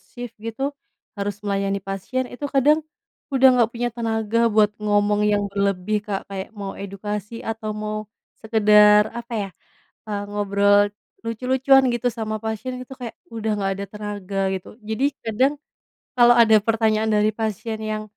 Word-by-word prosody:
shift 245 Hz, -2 st, -9 dB
gitu, 250 Hz, +6 st, -3 dB, 0.4 s
harus 205 Hz, 0 st, -5 dB
melayani 200 Hz, -1 st, 0 dB
pasien 195 Hz, +6 st, -3 dB
itu 265 Hz, +4 st, -6 dB
kadang, 290 Hz, +3 st, +4 dB, 0.5 s
udah 265 Hz, -1 st, +5 dB
nggak 240 Hz, -2 st, +3 dB
punya 240 Hz, 0 st, -3 dB
tenaga 230 Hz, 0 st, +1 dB
buat 210 Hz, -1 st, +3 dB
ngomong 210 Hz, 0 st, +2 dB
yang 205 Hz, -1 st, +2 dB
berlebih 200 Hz, +1 st, 0 dB
Kak 195 Hz, -1 st, -2 dB
kayak 195 Hz, -1 st, -6 dB
mau 200 Hz, -1 st, -5 dB
edukasi 205 Hz, +3 st, -6 dB
atau 215 Hz, -1 st, -4 dB
mau, 215 Hz, 0 st, -4 dB, 0.3 s
sekedar 210 Hz, -1 st, +5 dB
apa 235 Hz, 0 st, -6 dB
ya, 200 Hz, -2 st, -3 dB, 0.6 s
eee, 205 Hz, -1 st, -2 dB
ngobrol, 205 Hz, 0 st, +3 dB, 0.4 s
lucu-lucuan 260 Hz, +3 st, +3 dB
gitu 240 Hz, +1 st, 0 dB
sama 215 Hz, -1 st, -3 dB
pasien 240 Hz, +4 st, -4 dB
itu 255 Hz, +1 st, -10 dB
kayak 235 Hz, -2 st, -5 dB, 0.2 s
udah 220 Hz, -1 st, -2 dB
nggak 195 Hz, -1 st, 0 dB
ada 200 Hz, -, -3 dB
tenaga 205 Hz, -2 st, -5 dB, 0.2 s
gitu 190 Hz, +2 st, -8 dB
jadi 220 Hz, +5 st, -2 dB, 0.2 s
kadang, 255 Hz, +6 st, +2 dB, 0.7 s
kalau 240 Hz, 0 st, +7 dB
ada 225 Hz, -2 st, +6 dB
pertanyaan 220 Hz, -1 st, +1 dB
dari 210 Hz, 0 st, +3 dB
pasien 220 Hz, 0 st, -3 dB
yang 215 Hz, 0 st, -3 dB
215 Hz, 150 wpm, -22 LUFS, 205-235 Hz, 0.7 s, kalau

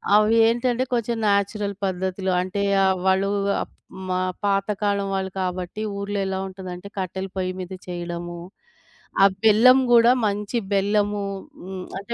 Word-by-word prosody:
అవి 215 Hz, +2 st, +4 dB
ఏంటంటే, 240 Hz, +2 st, +1 dB
కొంచెం 235 Hz, 0 st, 0 dB
నేచురల్ 200 Hz, 0 st, +1 dB
పద్ధతులు 190 Hz, 0 st, -2 dB
అంటే 185 Hz, +2 st, -3 dB, 0.2 s
ఆహ్, 190 Hz, 0 st, +3 dB
వాళ్ళూ 190 Hz, +1 st, +3 dB, 0.3 s
అప్ -, -, -7 dB, 0.4 s
మా 185 Hz, -, +1 dB, 0.3 s
పాతకాలం 200 Hz, 0 st, 0 dB
వాళ్ళు 190 Hz, 0 st, -2 dB
కాబట్టి 185 Hz, +3 st, -3 dB, 0.2 s
ఊర్లో 200 Hz, 0 st, -3 dB
ఎలా 190 Hz, 0 st, -2 dB
ఉంటదంటే, 185 Hz, 0 st, -8 dB
కట్టెల 190 Hz, 0 st, -3 dB
పొయ్యి 185 Hz, 0 st, -1 dB
మీద 185 Hz, +1 st, -6 dB
చెయడము, 175 Hz, 0 st, -5 dB, 0.8 s
ఆ -, -, +10 dB, 0.2 s
బెల్లం 230 Hz, +4 st, +7 dB
గూడా 235 Hz, 0 st, +7 dB, 0.2 s
మంచి 205 Hz, +3 st, -2 dB, 0.2 s
బెల్లము 205 Hz, +1 st, +1 dB, 0.4 s
హ్మ్ 185 Hz, -1 st, -6 dB
అంటే, 235 Hz, +4 st, -6 dB
195 Hz, 135 wpm, -23 LUFS, 185-210 Hz, 0.8 s, ఆ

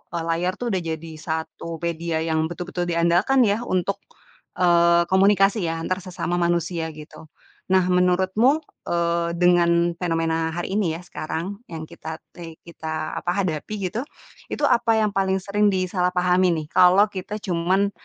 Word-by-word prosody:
e -, -, 0 dB
layar 180 Hz, +3 st, -1 dB
tuh 240 Hz, -1 st, -3 dB
udah 190 Hz, -, +1 dB
jadi 165 Hz, -1 st, -5 dB
1 160 Hz, +1 st, -5 dB
media 165 Hz, -1 st, -2 dB
yang 160 Hz, -1 st, 0 dB
betul-betul 175 Hz, +1 st, -4 dB
diandalkan 170 Hz, +10 st, +3 dB
ya, 205 Hz, 0 st, +2 dB
untuk, 185 Hz, +2 st, -1 dB, 0.6 s
eee, 170 Hz, -1 st, +4 dB
komunikasi 195 Hz, 0 st, +4 dB
ya, 165 Hz, -, -1 dB
antar 185 Hz, +2 st, -1 dB
sesama 175 Hz, -1 st, -3 dB
manusia, 170 Hz, -1 st, 0 dB
gitu. 155 Hz, +1 st, -12 dB, 0.4 s
Nah, 185 Hz, 0 st, +4 dB
menurutmu, 190 Hz, -, +2 dB, 0.2 s
eee, 170 Hz, 0 st, 0 dB
dengan 175 Hz, -1 st, +3 dB
fenomena 165 Hz, -1 st, -1 dB
hari 175 Hz, +2 st, -4 dB
ini 170 Hz, -6 st, 0 dB
ya, 165 Hz, -, -8 dB
sekarang, 180 Hz, +3 st, -5 dB
yang 160 Hz, -1 st, -5 dB
kita 160 Hz, 0 st, -8 dB, 0.2 s
te 165 Hz, -2 st, -10 dB
kita, 160 Hz, -2 st, -5 dB
apa, 180 Hz, +3 st, -1 dB
hadapi 160 Hz, +3 st, -3 dB, 0.2 s
gitu, 230 Hz, -, -2 dB, 0.5 s
itu -, -, -5 dB
apa 230 Hz, -1 st, +3 dB
yang 210 Hz, -, +1 dB
paling 195 Hz, -1 st, +1 dB
sering 205 Hz, +1 st, +1 dB
disalahpahamin, 180 Hz, -1 st, +2 dB
nih? -, -, -12 dB
Kalau 180 Hz, +3 st, +6 dB
kita 190 Hz, +1 st, -5 dB
cuman, 185 Hz, +3 st, +1 dB
175 Hz, 150 wpm, -23 LUFS, 165-190 Hz, 0.6 s, Kalau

